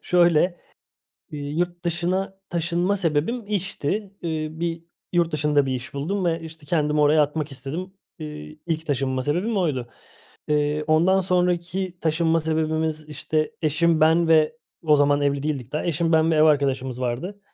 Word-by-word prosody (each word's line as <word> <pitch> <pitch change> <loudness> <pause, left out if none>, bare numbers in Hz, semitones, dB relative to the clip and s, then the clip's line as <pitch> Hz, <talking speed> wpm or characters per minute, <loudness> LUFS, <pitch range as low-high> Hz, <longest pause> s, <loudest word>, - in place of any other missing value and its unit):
Şöyle, 175 0 +3 0.7
iii, 145 +2 -4
yurt 175 0 -2
dışına 185 +3 -1
taşınma 175 +3 0
sebebim, 185 +7 0
işti. 195 0 -2
Eee, 160 -2 -2
bir 165 0 -4 0.3
yurt 170 -1 +2
dışında 150 -2 +2
bir 130 - -1
iş 125 +2 -7
buldum 180 +8 -2
ve, 165 -1 0
işte, 160 -2 -11
kendimi 150 -1 +1
oraya 150 +1 +5
atmak 150 0 -3
istedim. 160 +8 -6 0.3
Eee, 150 0 -8
ilk 160 -1 -2
taşınma 130 -2 -1
sebebim 185 - 0
oydu. 135 -9 0 0.6
Eee, 150 0 +1
ondan 170 +5 +4
sonraki 180 0 0
taşınma 165 +1 +2
sebebimiz, 155 0 -1
işte, 155 +2 -1
eşim, 160 +1 +2
ben 165 +2 +4
ve 160 +7 +4 0.3
o 150 -2 +5
zaman 145 0 +3
evli 140 0 0
değildik 140 -6 -3
daha. 150 - -2
Eşim, 165 0 0
ben 160 0 +4
ve - - +2
ev 155 - +5
arkadaşımız 135 -4 +1
vardı. 140 +12 -3
160 Hz, 155 wpm, -24 LUFS, 150-175 Hz, 0.7 s, oraya